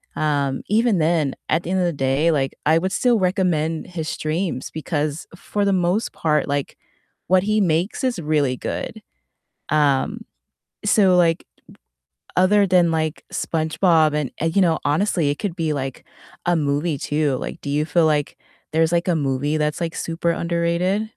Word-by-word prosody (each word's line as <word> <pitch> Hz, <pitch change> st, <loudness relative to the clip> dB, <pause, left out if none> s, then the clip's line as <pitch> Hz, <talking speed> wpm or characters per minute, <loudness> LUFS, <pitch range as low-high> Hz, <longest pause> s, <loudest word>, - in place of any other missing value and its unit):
um, 140 Hz, -3 st, 0 dB
even 220 Hz, 0 st, +2 dB
then, 160 Hz, -3 st, +1 dB
at 160 Hz, +2 st, +1 dB
the 170 Hz, -, -6 dB
end 190 Hz, -, +1 dB
of 180 Hz, -, +2 dB
the 170 Hz, -, 0 dB
day, 140 Hz, +4 st, +1 dB
like, 135 Hz, -3 st, -1 dB
I 160 Hz, +2 st, +4 dB
would 190 Hz, +2 st, -2 dB
still 240 Hz, -3 st, +2 dB
recommend 175 Hz, -4 st, 0 dB
his 165 Hz, -3 st, -5 dB
streams 155 Hz, -3 st, -3 dB
because 155 Hz, -1 st, -3 dB
for 205 Hz, +2 st, -3 dB
the 200 Hz, -1 st, +2 dB
most 180 Hz, +4 st, 0 dB
part, 150 Hz, -2 st, 0 dB
like, 140 Hz, -1 st, -2 dB, 0.5 s
what 185 Hz, +1 st, +4 dB
he 215 Hz, +1 st, +1 dB
makes 175 Hz, -, 0 dB
is 255 Hz, -5 st, 0 dB
really 150 Hz, -5 st, 0 dB
good. -, -, -5 dB, 0.7 s
Um, 145 Hz, -3 st, +1 dB, 0.6 s
so, 195 Hz, -3 st, +4 dB
like, 165 Hz, -1 st, +2 dB, 0.9 s
other 200 Hz, +2 st, +4 dB
than, 175 Hz, -2 st, +4 dB
like, 155 Hz, -1 st, -2 dB
SpongeBob 160 Hz, -1 st, +2 dB
and 150 Hz, -4 st, -1 dB
uh, -, -, +1 dB
you 180 Hz, +4 st, +2 dB
know, 165 Hz, -3 st, +3 dB
honestly 160 Hz, 0 st, +1 dB
it 145 Hz, -, -2 dB
could 195 Hz, -5 st, -3 dB
be 160 Hz, -3 st, -1 dB
like 135 Hz, -2 st, -5 dB, 0.4 s
a 175 Hz, 0 st, +2 dB
movie 145 Hz, +1 st, 0 dB
too. 145 Hz, -1 st, 0 dB
Like, 165 Hz, -, -6 dB
do 140 Hz, -, -6 dB
you 150 Hz, +2 st, 0 dB
feel, 160 Hz, +1 st, +2 dB
like, 150 Hz, -2 st, 0 dB, 0.4 s
there's, 160 Hz, +1 st, +2 dB
like, 170 Hz, +1 st, +1 dB
a 175 Hz, -, +2 dB
movie 145 Hz, +1 st, -1 dB
that's 150 Hz, +2 st, -1 dB
like 165 Hz, -1 st, -2 dB
super 170 Hz, +1 st, -1 dB
underrated? 170 Hz, +4 st, 0 dB
165 Hz, 170 wpm, -21 LUFS, 150-180 Hz, 0.9 s, I